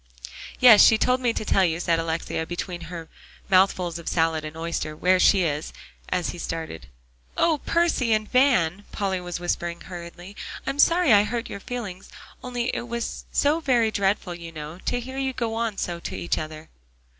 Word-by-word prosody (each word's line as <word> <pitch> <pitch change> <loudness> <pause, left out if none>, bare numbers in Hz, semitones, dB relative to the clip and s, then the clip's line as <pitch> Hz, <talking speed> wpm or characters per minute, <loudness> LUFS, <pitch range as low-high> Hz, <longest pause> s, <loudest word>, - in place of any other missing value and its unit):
"Yes, 240 -5 +9
she 220 - +6
told 250 +3 +2
me 245 -2 +2
to 215 - -4
tell 195 - +3
you," 165 -2 +1
said 170 -1 +1
Alexia, 165 0 -2
between 175 0 -5
her 170 -2 -7 0.4
mouthfuls 185 -2 +3
of 170 - -12
salad 160 -2 +1
and 155 +1 -7
oyster, 165 -2 -3
"where 185 +3 +3
she 190 0 +5
is," 150 -2 -2 0.4
as 180 -1 -1
he 175 - -7
started. 160 - -5 0.5
"Oh, 320 -3 +3
Percy 335 -8 +2
and 215 -1 +2
Van!" 205 - +3
Polly 190 -2 -2
was 175 -1 -5
whispering 175 -1 -3
hurriedly, 175 +2 -9 0.3
"I'm 275 +1 -3
sorry 335 -5 +5
I 205 - +7
hurt 230 +2 -4
your 200 - -5
feelings, 210 -6 -6 0.3
only 245 0 -2
it 240 - -4
was 235 0 -4
so 295 +3 +2
very 245 -7 +2
dreadful, 200 -2 0
you 170 -1 -9
know, 155 +2 -8
to 245 - 0
hear 260 +2 -6
you 265 -1 -1
go 230 -3 -2
on 225 -2 -2
so 170 -1 -3
to - - -6
each 85 -2 -1
other." 155 0 -8
185 Hz, 185 wpm, -24 LUFS, 170-235 Hz, 0.5 s, Yes